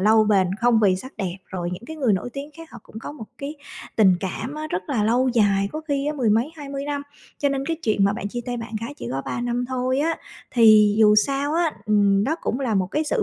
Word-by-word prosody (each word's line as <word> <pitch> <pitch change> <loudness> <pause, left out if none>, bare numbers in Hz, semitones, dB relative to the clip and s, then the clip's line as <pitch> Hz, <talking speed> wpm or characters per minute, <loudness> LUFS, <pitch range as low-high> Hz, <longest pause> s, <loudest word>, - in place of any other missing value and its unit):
lâu 215 +2 +5
bền, 190 -3 +2
không 235 -2 +4
vì 190 -3 +4
sắc 260 +8 -9
đẹp, 190 -3 -3
rồi 175 -2 -4
những 190 +6 -7
cái 315 - -7
người 255 -8 +2
nổi 195 +6 -2
tiếng 280 +3 -6
khác 330 -1 -11
họ 240 - -10
cũng 220 - -11
có 260 - -7
một 260 -7 -9
cái 285 +2 -5 0.4
tình 190 -5 +5
cảm 220 - -4
á, 310 0 -4
rất 180 - -1
là 220 -6 +1
lâu 250 +4 +2
dài, 200 -4 +2
có 310 - -4
khi 280 0 0
á 300 - 0
mười 250 -7 +1
mấy 230 +7 +2
20 280 -1 -5
năm, 285 -1 -3 0.4
cho 285 - +2
nên 275 0 -2
cái 330 - -1
chuyện 210 -3 +2
mà 200 - +3
bạn 205 -2 -4
chia 240 +3 -4
tay 245 0 -2
bạn 230 -1 -7
gái 250 +6 -6
chỉ 120 - -6
có 135 +1 -2
3 240 - -3
năm 245 0 -1
thôi 255 +1 0
á, 325 +2 +1 0.3
thì 215 -3 +6
dù 210 -1 +6
sao 275 +6 +1
á, 335 -2 +1
ừm, 200 -1 +3
đó 315 +4 0
cũng 250 - -2
là 235 -5 0
một 185 -2 +1
cái 310 +1 0
sự 430 +8 0
240 Hz, 270 wpm, -23 LUFS, 205-280 Hz, 0.4 s, thì